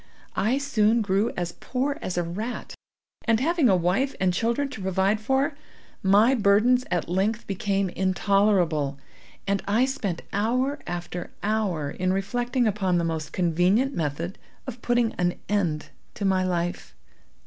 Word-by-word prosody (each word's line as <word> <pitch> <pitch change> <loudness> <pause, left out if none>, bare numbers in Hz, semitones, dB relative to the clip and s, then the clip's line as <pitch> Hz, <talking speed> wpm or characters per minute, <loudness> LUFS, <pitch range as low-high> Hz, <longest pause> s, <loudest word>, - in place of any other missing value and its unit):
I 230 +6 +2
soon 230 -5 +2
grew 200 +3 +1
as 175 -1 -2
poor 275 - -3
as 180 - -4
a 175 - +2
rat, 210 +9 -5 0.5
and, 225 -2 +3
having 315 -1 +3
a 190 - +5
wife 180 +11 +1
and 185 -1 +2
children 235 +9 0
to 220 - -8
provide 190 +2 +1
for, 270 +6 0 0.5
my 205 +6 +5
burdens 230 +3 +4
at 175 - -1
length 200 +5 0
became 195 -1 -1
intolerable, 185 -6 +1 0.5
and 200 0 0
I 220 +5 +3
spent 210 -11 -3
hour 255 +8 0
after 175 0 -5
hour 200 -9 0
in 185 0 0
reflecting 245 +6 0
upon 195 -4 +1
the 170 - +1
most 160 -2 -3
convenient 185 - +2
method 165 - -3 0.3
of 250 -2 -7
putting 240 -2 +1
an 175 0 +1
end 175 -7 0 0.3
to 205 - -3
my 190 -1 +2
life. 175 - -2
200 Hz, 150 wpm, -25 LUFS, 180-235 Hz, 0.5 s, a